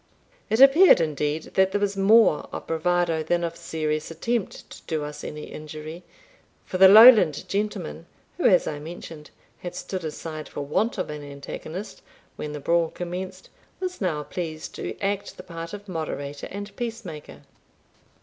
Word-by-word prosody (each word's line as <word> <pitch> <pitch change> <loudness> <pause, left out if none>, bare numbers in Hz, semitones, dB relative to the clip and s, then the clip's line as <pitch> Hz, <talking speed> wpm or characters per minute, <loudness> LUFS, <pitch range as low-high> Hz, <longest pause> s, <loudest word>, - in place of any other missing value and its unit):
It 220 - +1
appeared, 275 - +8
indeed, 150 -1 -2
that 190 0 +3
there 205 - +1
was 200 -1 0
more 200 -3 +4
of - - -6
bravado 165 0 +1
than 175 +2 0
of 170 0 -3
serious 155 -2 -3
attempt 215 +6 -3
to - - -11
do 155 -3 -2
us 150 0 -7
any 150 0 -6
injury; 155 +2 -8 0.6
for 185 - -4
the 190 - +10
Lowland 210 - +8
gentleman, 210 +1 -3 0.3
who, 360 - -2
as 180 -4 +5
I 150 - -4
mentioned, 160 -1 -9 0.3
had 175 - -7
stood 185 -2 -5
aside 155 0 -6
for - - -6
want 155 +12 0
of 185 -5 -3
an 150 0 -6
antagonist 155 +7 -8 0.3
when 150 - -5
the 150 - -5
brawl 170 +2 +1
commenced, 185 +2 -6 0.3
was 365 -5 -4
now 160 -6 -1
pleased 160 -1 -6
to - - -6
act 200 0 -2
the 185 - -9
part 165 -1 -7
of 205 0 -9
moderator 145 -5 -5
and 205 +1 -7
peacemaker. 185 - -7
170 Hz, 160 wpm, -25 LUFS, 155-200 Hz, 0.6 s, the